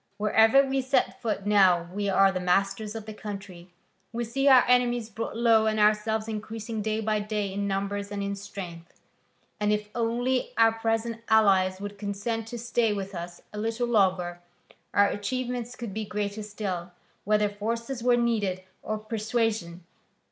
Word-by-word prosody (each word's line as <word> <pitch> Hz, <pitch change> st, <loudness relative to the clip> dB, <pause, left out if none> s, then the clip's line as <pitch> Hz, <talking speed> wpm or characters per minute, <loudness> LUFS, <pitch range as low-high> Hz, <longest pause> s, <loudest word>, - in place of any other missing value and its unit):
Wherever 220 Hz, +6 st, +5 dB
we 270 Hz, 0 st, 0 dB
set 265 Hz, +1 st, 0 dB
foot 210 Hz, -4 st, -2 dB
now 190 Hz, -5 st, +4 dB
we 200 Hz, 0 st, -1 dB
are 195 Hz, 0 st, +5 dB
the 185 Hz, -, -2 dB
masters 195 Hz, +4 st, 0 dB
of 220 Hz, -2 st, -6 dB
the 215 Hz, -, -7 dB
country: 195 Hz, -4 st, -8 dB, 0.4 s
we 235 Hz, +1 st, -2 dB
see 270 Hz, +5 st, -1 dB
our 260 Hz, -3 st, +7 dB
enemies 245 Hz, -2 st, +2 dB
brought 225 Hz, +1 st, -5 dB
low 225 Hz, -2 st, +4 dB
and 215 Hz, 0 st, +1 dB
ourselves 215 Hz, +1 st, +2 dB
increasing 220 Hz, 0 st, -5 dB
day 215 Hz, +1 st, -1 dB
by 215 Hz, -1 st, 0 dB
day 210 Hz, -2 st, -2 dB
in 200 Hz, +1 st, -2 dB
numbers 200 Hz, +1 st, -2 dB
and 205 Hz, -1 st, -3 dB
in 200 Hz, 0 st, -2 dB
strength. 185 Hz, -4 st, -9 dB, 0.6 s
And 210 Hz, 0 st, +1 dB
if 210 Hz, 0 st, -1 dB
only 245 Hz, +2 st, 0 dB
our 225 Hz, 0 st, +6 dB
present 225 Hz, 0 st, -2 dB
allies 190 Hz, -4 st, +4 dB
would 205 Hz, 0 st, -7 dB
consent 210 Hz, +3 st, -3 dB
to 240 Hz, -, -6 dB
stay 235 Hz, -1 st, +1 dB
with 195 Hz, -1 st, -5 dB
us 175 Hz, 0 st, -7 dB
a 210 Hz, -, -5 dB
little 225 Hz, +2 st, -1 dB
longer, 185 Hz, -6 st, +1 dB, 0.5 s
our 205 Hz, -, +5 dB
achievements 245 Hz, +3 st, -3 dB
could 235 Hz, -6 st, -6 dB
be 215 Hz, +1 st, -3 dB
greater 205 Hz, +1 st, -3 dB
still, 195 Hz, -4 st, -5 dB, 0.3 s
whether 210 Hz, 0 st, +2 dB
force 230 Hz, +5 st, -4 dB
were 245 Hz, 0 st, +4 dB
needed 210 Hz, -6 st, 0 dB, 0.2 s
or 215 Hz, -, -3 dB
persuasion. 215 Hz, -5 st, -2 dB
215 Hz, 165 wpm, -27 LUFS, 200-230 Hz, 0.6 s, our